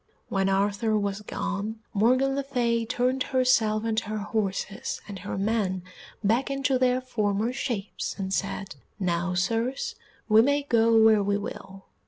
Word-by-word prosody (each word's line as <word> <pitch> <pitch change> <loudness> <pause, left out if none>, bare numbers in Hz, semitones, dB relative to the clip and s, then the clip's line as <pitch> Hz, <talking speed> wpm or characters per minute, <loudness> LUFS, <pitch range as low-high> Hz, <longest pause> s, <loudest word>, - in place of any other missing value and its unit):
When 195 0 +1
Arthur 205 +3 +1
was 200 0 -2
gone, 210 +1 -3 0.2
Morgan 255 +6 +3
le 280 - 0
Fay 240 -4 0
turned 255 +2 0
herself 250 -5 +2
and 225 -1 +1
her 215 -1 -4
horses 200 -2 -2
and 200 -2 -7
her 180 - -5
men 195 -3 0 0.4
back 230 +7 +2
into 275 -1 +1
their 255 0 +3
former 220 -2 -1
shapes 235 -7 -3
and 190 -1 -3
said, 195 -4 -3 0.2
"Now, 180 -1 0
Sirs, 235 - -1 0.3
we 215 0 +7
may 285 +4 +2
go 230 -4 +3
where 220 -1 +6
we 200 0 +1
will." 195 -1 -8
220 Hz, 150 wpm, -26 LUFS, 200-250 Hz, 0.4 s, we